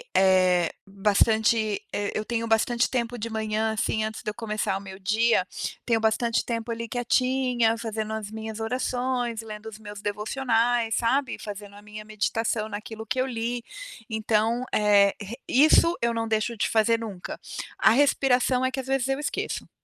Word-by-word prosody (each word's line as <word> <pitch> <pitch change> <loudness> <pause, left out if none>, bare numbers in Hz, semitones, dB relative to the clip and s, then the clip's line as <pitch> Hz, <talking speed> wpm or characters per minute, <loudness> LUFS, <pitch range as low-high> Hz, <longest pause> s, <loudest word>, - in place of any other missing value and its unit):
Eh, 185 -3 +4
bastante, 215 +2 +2 0.3
eu 215 - -2
tenho 230 0 -2
bastante 235 +2 +2
tempo 245 -1 -2
de 230 +1 -4
manhã 220 0 -1
assim 220 0 0
antes 220 0 -4
de - - -2
eu - - -4
começar 215 -3 -2
o - - -6
meu 190 0 -10
dia, 215 0 +2 0.4
tenho 230 -2 +2
bastante 225 +1 +1
tempo 230 0 -3
ali 230 0 -4
quietinha, 245 -1 +1
fazendo 220 -1 -4
as 220 -2 -4
minhas 220 0 -6
orações, 245 0 -1
lendo 215 0 -9
os 215 -1 -12
meus 205 -1 -9
devocionais, 230 +2 0
sabe. 260 +4 +1
Fazendo 205 -1 -8
a 205 - -12
minha 210 0 -9
meditação 215 +1 -1
naquilo 220 +1 -7
que 225 +5 -2
eu - - +1
li, 235 0 -3 0.5
então 220 +2 +1
é, 205 -1 +5
re 205 +3 -6
isso 310 +5 +5
eu 235 0 +1
não 225 0 -2
deixo 220 +1 0
de - - +1
fazer 230 0 +3
nunca. 200 -6 -6 0.4
A - - +5
respiração 255 -1 +3
é 260 - 0
que 265 - -4
às 265 - -5
vezes 270 -1 +1
eu 270 +1 0
esqueço. 295 - -3
225 Hz, 170 wpm, -26 LUFS, 215-240 Hz, 0.5 s, é